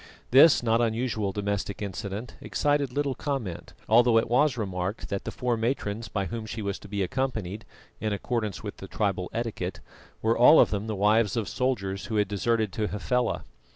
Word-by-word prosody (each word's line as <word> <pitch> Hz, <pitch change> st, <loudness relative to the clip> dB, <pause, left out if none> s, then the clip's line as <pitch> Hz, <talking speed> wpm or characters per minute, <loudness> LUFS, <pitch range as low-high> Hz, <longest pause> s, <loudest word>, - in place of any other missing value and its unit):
This 140 Hz, +2 st, +7 dB
not 115 Hz, 0 st, +3 dB
unusual 115 Hz, -3 st, 0 dB
domestic 100 Hz, 0 st, -2 dB
incident 100 Hz, +3 st, -5 dB
excited 145 Hz, -2 st, 0 dB
little 140 Hz, +1 st, 0 dB
comment, 130 Hz, -, -4 dB
although 120 Hz, +1 st, +5 dB
it 115 Hz, -, +2 dB
was 130 Hz, +2 st, +3 dB
remarked 95 Hz, -1 st, -3 dB
that 100 Hz, -, -3 dB
the -, -, -3 dB
four 125 Hz, -1 st, -1 dB
matrons 115 Hz, -2 st, -2 dB
by 100 Hz, -3 st, -2 dB
whom 115 Hz, +1 st, -5 dB
she 110 Hz, 0 st, -5 dB
was 100 Hz, -1 st, -3 dB
to -, -, -12 dB
be 100 Hz, -1 st, -1 dB
accompanied, 110 Hz, -3 st, -3 dB, 0.3 s
in 110 Hz, -, -1 dB
accordance 110 Hz, +1 st, -2 dB
with 105 Hz, -, -6 dB
the 95 Hz, -, -9 dB
tribal 95 Hz, -3 st, -1 dB
etiquette, 115 Hz, -1 st, -3 dB, 0.4 s
were 115 Hz, +1 st, +3 dB
all 125 Hz, +7 st, +8 dB
of -, -, +5 dB
them 105 Hz, +1 st, -2 dB
the 110 Hz, -, -2 dB
wives 105 Hz, +2 st, +3 dB
of 110 Hz, -, -1 dB
soldiers 100 Hz, -7 st, -1 dB
who 110 Hz, -, -4 dB
had 105 Hz, -2 st, +2 dB
deserted 110 Hz, +1 st, 0 dB
to 105 Hz, -1 st, -1 dB
Hafela. 120 Hz, +4 st, -1 dB
110 Hz, 185 wpm, -27 LUFS, 100-120 Hz, 0.4 s, all